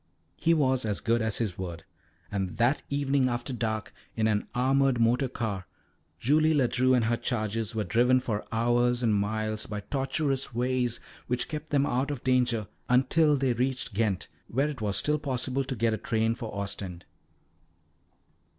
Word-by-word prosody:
He 165 +1 +2
was 130 -4 +2
as 105 -2 -1
good 115 0 +1
as 110 -1 0
his 105 -7 -2
word, 85 -3 -5 0.5
and 95 -3 -2
that 125 +5 +2
evening 140 -2 +1
after 120 +2 -3
dark, 110 -3 -2 0.2
in 110 - +1
an 105 -1 +1
armoured 135 0 +3
motor 120 +4 +3
car, 100 -7 -3 0.5
Julie 155 +7 +3
Ledru 130 -1 +3
and 120 -3 +2
her 120 +1 +1
charges 115 -2 -2
were 110 - 0
driven 120 +6 +3
for 110 -4 -2
hours 120 +2 +2
and 110 -2 +3
miles 110 +1 -1
by 105 -1 -4
tortuous 135 +2 -1
ways 125 -1 0 0.3
which 125 0 -1
kept 155 0 -6
them 140 -1 +2
out 130 +1 0
of 140 -4 -4
danger, 125 -4 +2 0.2
until 150 +5 +4
they 130 -2 +1
reached 125 0 -1
Ghent, 100 -3 0 0.2
where 140 +5 +1
it 140 -6 -6
was 100 -2 0
still 150 0 +1
possible 130 -1 -1
to 130 0 -4
get 115 0 +1
a - - 0
train 115 +1 +1
for 115 -2 -6
Ostend. 95 -3 -5
120 Hz, 170 wpm, -28 LUFS, 110-135 Hz, 0.5 s, until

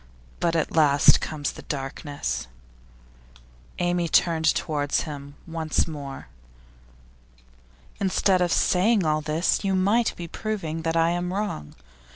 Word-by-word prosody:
But 170 -1 +1
at 160 - -1
last 145 -3 +5
comes 145 -2 -3
the - - -11
darkness.' 135 - -4 1.3
Amy 175 -1 0
turned 160 -1 +3
towards 145 -3 0
him 145 -2 -8
once 160 -2 -1
more. 140 -4 -7 1.7
'Instead 190 -1 +2
of 175 -1 +1
saying 195 +3 +3
all 155 0 +1
this, 155 +6 0
you 195 -1 +1
might 205 +5 +2
be 170 - -7
proving 170 -4 -4
that 165 0 -1
I 165 +1 +3
am 175 +1 -2
wrong. 190 - -4
165 Hz, 125 wpm, -25 LUFS, 150-180 Hz, 1.7 s, last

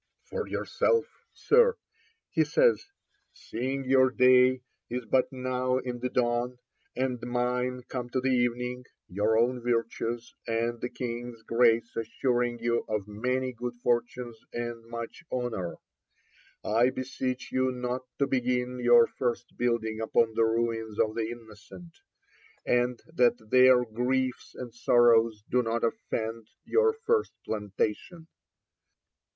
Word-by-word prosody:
'For 470 -2 -3
yourself, 460 -2 +1 0.3
Sir,' 475 +1 +3 0.5
he - - +3
says, 485 -1 +3 0.5
'seeing 130 +4 -4
your 130 0 +5
day 125 0 +5 0.3
is 125 0 -4
but 130 +3 +2
now 130 0 -1
in 125 -1 -4
the 125 +1 -2
dawn, 120 0 0 0.4
and 125 -1 -1
mine 125 +1 -1
come 125 -2 -5
to 130 - -1
the 130 +1 0
evening, 125 0 0 0.2
your 105 +4 +1
own 125 +2 +2
virtues 115 0 -2
and 115 +1 -1
the 125 - -2
King's 120 -2 -6
grace 115 0 +2
assuring 120 +1 -1
you 120 0 0
of 105 -2 -2
many 125 +5 -2
good 120 +1 -5
fortunes 120 -1 -1
and 120 -1 -5
much 115 +4 -7
honour, 120 -8 -3 0.9
I 115 +4 +3
beseech 130 0 -4
you 130 0 +1
not 125 0 -3 0.2
to 140 - +2
begin 125 -1 -1
your 120 -1 +6
first 120 -1 -3
building 115 -2 -1
upon 110 0 +2
the 115 - +3
ruins 115 -1 -1
of 110 - +2
the 110 -1 -2
innocent; 120 - -12 0.7
and 125 0 +1
that 120 -6 +2
their 130 -1 +6
griefs 125 +3 -2
and 120 -2 -7
sorrows 115 -2 +4
do 125 - +2
not 115 0 -2
attend 115 -1 -3 0.2
your 450 0 +3
first 450 -1 +1
plantation.' 105 - -3
120 Hz, 130 wpm, -28 LUFS, 115-125 Hz, 0.9 s, your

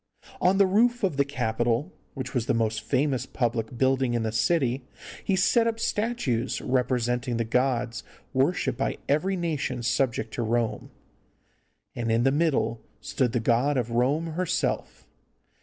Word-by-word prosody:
On 185 +2 +4
the 200 - +6
roof 235 +5 +2
of 180 -8 +1
the 140 - +4
Capitol, 120 +2 -1 0.2
which 130 -2 -5
was 120 -2 -1
the - - +2
most 110 -1 0
famous 135 +3 0
public 120 -1 -2
building 130 -1 +2
in 115 - 0
the 110 - -1
city, 130 +1 +1 0.4
he 195 - +1
set 230 +5 +3
up 230 0 -1
statues 210 - -1
representing 125 -1 0
the 115 - +1
gods 120 -2 0 0.3
worshipped 135 -2 +1
by - - -1
every 180 +7 +1
nation 150 -8 -2
subject 115 -2 0
to - - -2
Rome, 115 0 -1 1.1
and 115 -1 -1
in 115 +1 +2
the 135 - +4
middle 145 -6 +1 0.2
stood 125 +3 -1
the 120 - 0
god 125 +5 +2
of 120 -2 -1
Rome 130 +7 +1
herself. 180 +1 -2
130 Hz, 155 wpm, -26 LUFS, 120-150 Hz, 1.1 s, the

